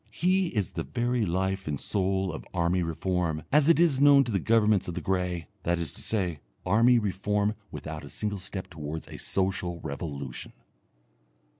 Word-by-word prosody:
He 185 +2 +1
is 105 - -2
the - - -3
very 120 - -1
life 95 +2 -1
and 75 -2 -2
soul 95 -2 0
of 80 - -6
army 90 +1 +2
reform, 85 -1 -1
as 150 +2 +5
it 165 - +5
is 155 -6 +3
known 140 -1 +7
to 120 - -4
the 100 - +1
governments 110 -3 +3
of 90 - -4
the - - -2
grey 90 -3 -1 0.2
that 85 +1 0
is 85 -4 -3
to - - -6
say, 90 -8 -1 0.3
army 115 +6 +5
reform 105 0 0 0.2
without 75 +1 -7
a 70 - -9
single 105 +3 -2
step 95 0 -3
towards 80 -2 -6
a - - -9
social 95 -3 -1
revolution.... 70 -3 -6
95 Hz, 175 wpm, -28 LUFS, 85-110 Hz, 0.3 s, known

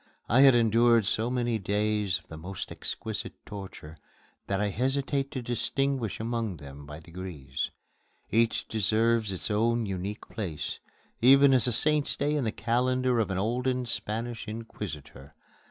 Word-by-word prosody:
I 120 +5 +5
have 135 -2 +8
endured 115 -1 +4
so 110 +4 +1
many 120 -2 0
days 105 -1 0
of - - -19
the 80 - -9
most 90 +4 -6
exquisite - - -4
torture 95 -6 -9 0.5
that 100 -1 0
I 105 0 +1
hesitate 135 +4 0
to 130 -3 -5
distinguish 130 0 -1
among 115 -4 -2
them 70 0 -11
by 75 +1 -8
degrees; 80 -5 -5 0.6
each 115 0 +2
deserves 110 +1 +2
its 95 +3 -4
own 115 +2 +2
unique 100 +1 -4
place, 95 -9 -4 0.4
even 135 +3 +7
as 130 -1 +4
a - - +2
Saint's 150 +5 +2
Day 145 +1 0
in 145 -4 0
the 110 - 0
calendar 125 +2 +1
of 110 - +1
an 95 - -1
olden 125 +5 0
Spanish 115 0 -4
inquisitor. 90 -11 -7
115 Hz, 150 wpm, -28 LUFS, 95-125 Hz, 0.6 s, have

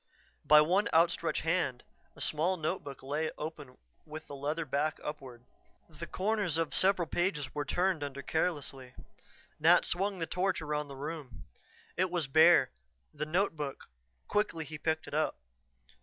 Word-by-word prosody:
By 150 0 +7
one 185 +8 +2
outstretched 165 0 +2
hand 160 -7 0 0.3
a - - -12
small 170 +5 +1
notebook 155 -4 -4
lay 150 +4 -1
open 150 -4 -7 0.3
with 155 0 -9
the 145 - -8
leather 150 +4 -2
back 150 +3 -1
upward. 130 -5 -7 0.5
The - - -8
corners 195 -4 -1
of 165 -2 -1
several 185 -3 +3
pages 170 -5 -1
were 145 -1 -2
turned 180 +1 0
under 140 -1 -5
carelessly 140 -6 -2 0.6
Nat 165 +3 +5
swung 195 +2 0
the 165 - -2
torch 185 +2 0
around 150 -1 -2
the 140 - -9
room. 145 -1 -7 0.5
It 185 0 +2
was 175 -3 -1
bare. 160 - +6 0.4
The 150 +1 -4
notebook 155 - -2 0.4
quickly 205 -6 0
he 155 0 -8
picked 160 0 -1
it - - -9
up. 155 +1 +1
155 Hz, 150 wpm, -31 LUFS, 145-175 Hz, 0.6 s, By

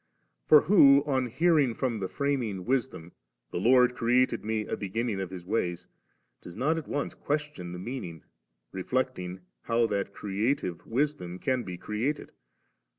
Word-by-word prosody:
For 150 - +8
who, 140 -6 +6
on 130 -3 0
hearing 140 -1 +2
from 120 -5 -1
the 95 - -2
Framing 120 -8 -2
Wisdom, 125 -10 -2 0.4
'The - - -2
Lord 125 +4 +5
created 125 +1 +2
me 110 0 -1
a - - -3
beginning 105 +1 -2
of 95 - -4
His 90 -2 -8
wajrs,' 90 -3 -2 0.6
does 85 - -11
not 160 +5 +1
at 160 - -10
once 145 - -2
question 145 - -3
the 90 - -6
meaning, 90 - -6 0.5
reflecting 95 -3 -2 0.2
how 115 0 +1
Uiat 100 -2 -2
creative 100 -2 -2
Wisdom 120 -8 -1
can 130 +5 0
be 90 -6 -7
created? 110 +10 -3
115 Hz, 150 wpm, -28 LUFS, 95-135 Hz, 0.6 s, For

